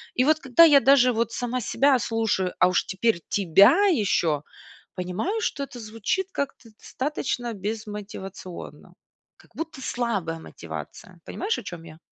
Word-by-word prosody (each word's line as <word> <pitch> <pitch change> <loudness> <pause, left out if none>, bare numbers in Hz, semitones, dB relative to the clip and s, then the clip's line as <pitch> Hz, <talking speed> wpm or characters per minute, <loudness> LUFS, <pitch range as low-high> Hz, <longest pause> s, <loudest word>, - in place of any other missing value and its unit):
И 255 - +3
вот 310 +3 +3
когда 270 +3 +5
я 295 -4 +8
даже, 270 -2 +5
вот, 230 0 -1
сама 245 +2 -3
себя 270 +4 +3
слушаю, 225 -5 -1
а 180 - +5
уж 185 - +1
теперь 190 -1 0
тебя 200 - +5
еще, 195 - +2 0.5
понимаю, 190 - -2
что 280 - -2
это 255 -3 -9
звучит 225 - -2
как-то 275 -6 -5
достаточно 255 -4 -3
безмотивационно. 205 -3 -7 0.4
Как - - -24
будто 325 -4 -6
слабая 205 -11 -2
мотивация. - - -9
Понимаешь, 425 +3 -2
о - - -10
чем 175 -4 -8
я? 160 -1 -12
230 Hz, 145 wpm, -25 LUFS, 195-275 Hz, 0.5 s, я